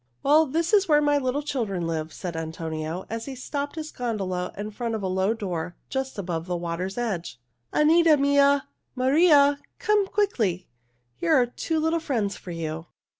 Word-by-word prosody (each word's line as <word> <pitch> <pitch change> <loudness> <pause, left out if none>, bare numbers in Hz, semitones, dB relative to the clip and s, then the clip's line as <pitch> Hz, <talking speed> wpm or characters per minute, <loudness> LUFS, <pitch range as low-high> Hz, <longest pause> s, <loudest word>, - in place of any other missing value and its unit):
"Well, 305 +3 +5
this 330 +7 -1
is 395 -2 +5
where 300 -2 +5
my 290 -1 +3
little 265 +2 -1
children 215 - -2
live," 160 -1 -3
said 175 +2 -6
Antonio, 160 +1 -4
as 230 0 -5
he 275 - -6
stopped 285 +3 -4
his 310 -1 -5
gondola 195 -7 -3
in 210 +1 -5
front 230 +1 -3
of 215 - -4
a - - 0
low 190 +4 +1
door 175 -5 -4 0.2
just 265 -2 -3
above 175 -3 -3
the 180 -1 -1
water's 175 +3 -4
edge. 190 - -3 0.3
"Anita 320 +1 +5
mia! 280 0 +3 0.3
Maria! 285 +2 +5 0.2
Come 420 -2 +2
quickly! 230 - 0 0.5
Here 165 - +2
are 250 - +5
two 315 +6 -2
little 320 +1 +1
friends 230 -11 -1
for - - -11
you." 165 -1 -5
235 Hz, 175 wpm, -25 LUFS, 180-290 Hz, 0.5 s, Well